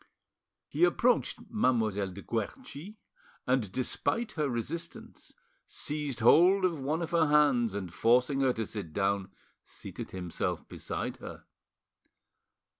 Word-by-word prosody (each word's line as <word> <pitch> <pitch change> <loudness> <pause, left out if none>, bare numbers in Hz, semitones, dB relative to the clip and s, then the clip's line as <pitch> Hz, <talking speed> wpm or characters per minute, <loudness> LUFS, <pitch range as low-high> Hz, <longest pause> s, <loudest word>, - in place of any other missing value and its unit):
He 155 +4 -1
approached 235 +8 +3
Mademoiselle 110 - +1
de 100 +2 -10
Guerchi, 140 - -5 0.5
and, 125 -7 +1
despite 215 - -1
her 150 -3 -1
resistance, 160 +8 -6 0.3
seized 145 -5 -5
hold 185 - +6
of 170 -4 0
one 150 +5 -1
of 165 - -5
her 165 -2 +3
hands, 140 -8 +3
and 95 -4 -5
forcing 125 +6 +3
her 130 -2 +3
to 110 -1 -3
sit 100 -9 -7
down, 100 -1 0 0.3
seated - - -8
himself 90 -2 -3
beside - - -5
her. - - -9
130 Hz, 120 wpm, -30 LUFS, 105-160 Hz, 0.5 s, hold